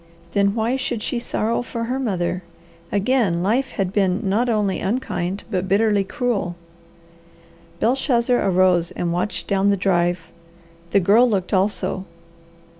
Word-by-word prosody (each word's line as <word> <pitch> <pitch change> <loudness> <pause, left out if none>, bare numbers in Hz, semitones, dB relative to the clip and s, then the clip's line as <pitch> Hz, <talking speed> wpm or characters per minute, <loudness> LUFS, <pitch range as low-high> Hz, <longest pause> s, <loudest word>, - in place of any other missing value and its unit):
Then 200 +2 +2
why 235 +3 0
should 240 -4 -3
she 240 - -1
sorrow 230 -1 -1
for 235 -1 -5
her 250 +3 -2
mother? 185 -7 -1 0.5
Again 205 -4 +1
life 240 +8 0
had 190 -1 -2
been 190 -2 +2
not 225 +6 +1
only 210 -4 0
unkind, 195 -4 -2
but 185 -1 -1
bitterly 205 0 +3
cruel. 210 -5 -2 1.2
Belshazzar 245 0 +2
arose 185 -3 +3
and 170 -1 -3
watched 180 +4 -2
down 200 0 +2
the 200 - +2
drive. 175 -3 0 0.6
The 200 - +3
Girl 220 +7 +5
looked 195 -3 -1
also. 190 0 0
200 Hz, 135 wpm, -21 LUFS, 185-235 Hz, 1.2 s, Girl